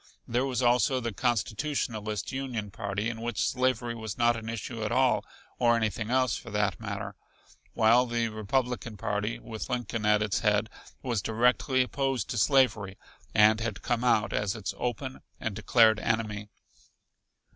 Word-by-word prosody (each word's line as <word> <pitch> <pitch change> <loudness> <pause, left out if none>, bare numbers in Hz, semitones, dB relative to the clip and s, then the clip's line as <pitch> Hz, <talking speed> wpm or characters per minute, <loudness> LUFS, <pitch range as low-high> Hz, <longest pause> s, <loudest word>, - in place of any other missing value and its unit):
There 125 +3 0
was 130 -1 -1
also 125 +2 +3
the 115 -3 -3
Constitutionalist 110 - -1
Union 125 -6 -4
party 100 +3 -3
in 115 -1 -4
which 120 -4 -1
slavery 125 -2 0
was 110 -2 -6
not 120 0 +3
an 110 -1 -6
issue 115 +1 -5
at 105 - -2
all 130 +1 +3 0.4
or 120 -1 +4
anything 110 -1 -1
else, 130 -2 +2
for - - -8
that 105 -2 0
matter 100 -2 -5 0.6
while 120 +3 +5
the 120 -1 0
Republican 115 +1 -2
party, 105 +1 -2
with 110 -2 -7
Lincoln 120 -2 -2
at 105 0 +4
its 105 -1 0
head, 105 +1 +1 0.3
was 120 -6 -1
directly 125 +4 +2
opposed 135 0 -2
to 120 - -1
slavery 110 -7 +2 0.4
and 110 0 +6
had 110 -4 -4
come 120 0 0
out 110 -4 +2
as 105 -1 0
its 95 -4 -4
open 125 +2 -3 0.2
and 110 -3 -3
declared 110 +1 +4
enemy. 105 -2 -2
115 Hz, 155 wpm, -28 LUFS, 105-125 Hz, 0.6 s, and